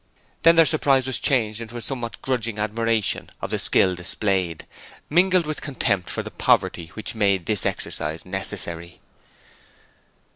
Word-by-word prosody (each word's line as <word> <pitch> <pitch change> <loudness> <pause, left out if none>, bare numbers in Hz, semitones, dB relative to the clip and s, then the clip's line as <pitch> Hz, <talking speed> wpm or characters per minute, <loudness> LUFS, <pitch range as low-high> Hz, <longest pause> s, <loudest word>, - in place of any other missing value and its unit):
Then 165 +1 +6
their 165 -1 +7
surprise 140 -4 +2
was 130 -1 0
changed 115 -5 0
into 115 +1 -8
a - - -6
somewhat 120 -1 -5
grudging 115 -4 -1
admiration 110 0 -1
of - - -5
the - - 0
skill 95 -1 +4
displayed, 90 -1 -1 0.5
mingled 180 +1 +4
with 155 0 -4
contempt 100 - -1
for - - -3
the - - -8
poverty 85 - +1
which 110 - -4
made 100 -5 +1
its 105 -3 +1
exercise 75 +2 -4
necessary. 90 -3 -2
110 Hz, 145 wpm, -23 LUFS, 95-130 Hz, 0.5 s, their